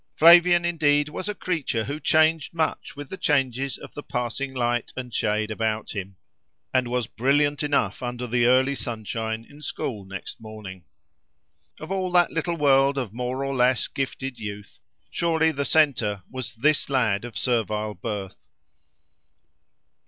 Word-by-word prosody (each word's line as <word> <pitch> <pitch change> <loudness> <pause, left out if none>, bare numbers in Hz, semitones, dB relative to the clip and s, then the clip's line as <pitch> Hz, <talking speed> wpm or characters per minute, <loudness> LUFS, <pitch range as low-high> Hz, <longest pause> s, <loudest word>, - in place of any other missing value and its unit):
Flavian 175 +2 +7
indeed 150 -3 +2
was 185 +6 -4
a 210 - -3
creature 155 -12 -1
who 145 +6 -4
changed 155 +1 +2
much 160 -1 -2
with 145 0 -7
the 190 - -5
changes 135 -4 0
of - - -12
the 145 - -6
passing 125 +1 -3
light 120 -2 -1
and 125 -2 -6
shade 105 +1 0
about 110 0 -2
him, 95 -1 -6 0.6
and 130 -1 +2
was 125 -1 -1
brilliant 145 +5 +1
enough 140 -9 0
under 125 0 -4
the 120 0 +2
early 130 +2 +4
sunshine 110 -2 -4
in 145 +1 -15
school 120 -6 -4
next 95 +3 -8
morning. 105 -5 -9 0.9
Of 160 +4 -8
all 190 -1 -1
that 175 -1 +4
little 170 +1 -2
world 140 -1 +4
of 120 -7 -3
more 125 +3 -3
or 135 - -2
less 125 0 +3
gifted 135 -1 -4
youth, 105 -2 -8 0.3
surely 160 -1 +2
the 140 -2 -2
centre 120 - +2
was 125 -2 -6
this 145 +6 +2
lad 115 -7 +1
of 120 -3 -7
servile 110 -3 0
birth. 100 0 -6
130 Hz, 150 wpm, -25 LUFS, 110-145 Hz, 0.9 s, Flavian